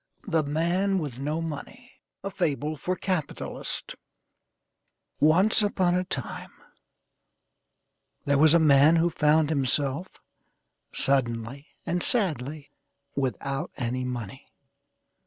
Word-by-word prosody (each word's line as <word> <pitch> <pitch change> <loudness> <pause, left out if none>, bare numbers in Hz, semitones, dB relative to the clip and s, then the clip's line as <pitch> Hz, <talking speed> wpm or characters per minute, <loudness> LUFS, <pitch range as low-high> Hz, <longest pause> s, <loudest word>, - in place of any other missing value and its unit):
THE 165 -5 +2
MAN 170 +6 0
WITH 145 -8 -4
NO 150 +4 -2
MONEY 165 - -7 0.3
A 195 - -4
FABLE 155 -4 -1
FOR 180 +6 -2
CAPITALISTS 180 -6 -4 1.3
Once 185 +9 +4
upon 190 -4 +1
a 180 +1 +1
time 140 -8 -5 1.8
there 140 0 +2
was 155 +2 +6
a - - +6
man 150 +1 +6
who 170 +1 +2
found 150 0 +3
himself, 140 +3 0 0.8
suddenly 130 +1 0 0.2
and 175 +1 -1
sadly, 155 - 0 0.4
without 135 0 -2
any 125 +1 -2
money. 120 -6 -6
150 Hz, 100 wpm, -26 LUFS, 140-175 Hz, 1.8 s, was